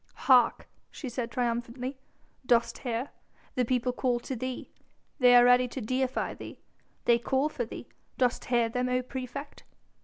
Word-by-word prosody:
"Hark!" 255 -2 +5 0.2
she 270 - -7
said 240 0 -3
triumphantly, 245 +2 -3 0.4
"dost 235 -1 +2
hear? 245 +1 -3 0.4
The 255 - +1
people 250 +1 0
call 245 -2 0
to 265 - -5
thee! 255 +1 -5 0.5
They 250 -1 +7
are 245 0 +8
ready 245 0 +5
to 255 - -6
deify 255 +3 -1
thee. - - -10 0.5
They 235 0 +4
call 270 +4 +1
for 265 -6 -3
thee, - - -9 0.3
dost 250 -1 +1
hear 240 -2 +2
them, 250 +2 -1
O 250 0 +1
praefect?" 260 +3 -7
250 Hz, 155 wpm, -29 LUFS, 240-260 Hz, 0.5 s, are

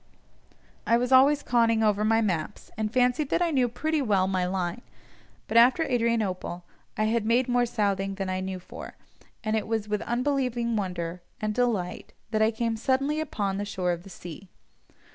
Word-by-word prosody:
I 230 - +5
was 250 +2 -1
always 280 +3 +6
conning 230 -2 +2
over 210 -1 +2
my 225 +1 +3
maps, 185 -3 -3
and 215 -1 -2
fancied 250 +4 +2
that - - +1
I 340 - +1
knew 255 -4 +2
pretty 310 +6 -1
well 200 -7 +2
my 185 -1 0
line, 185 +3 -2 0.7
but 225 - +1
after 250 +7 +6
Adrianople 225 - -1 0.3
I 215 - +1
had 225 +1 +1
made 235 +3 +2
more 245 -1 +2
southing 195 -3 -1
than 195 -1 -3
I 185 0 -1
knew 190 0 -4
for, 180 - -10 0.5
and 215 0 0
it 215 - -1
was 220 -2 -1
with 210 -1 -1
unbelieving 245 -2 0
wonder, 180 -3 -3 0.2
and 215 0 -1
delight, 220 -7 -1 0.2
that 215 -1 +1
I 220 - +5
came 230 0 -2
suddenly 275 +6 0
upon 205 -10 -2
the - - -1
shore 185 -3 -1
of 170 -1 -3
the 195 - -13
sea. 180 +1 -10
220 Hz, 180 wpm, -27 LUFS, 195-245 Hz, 0.7 s, always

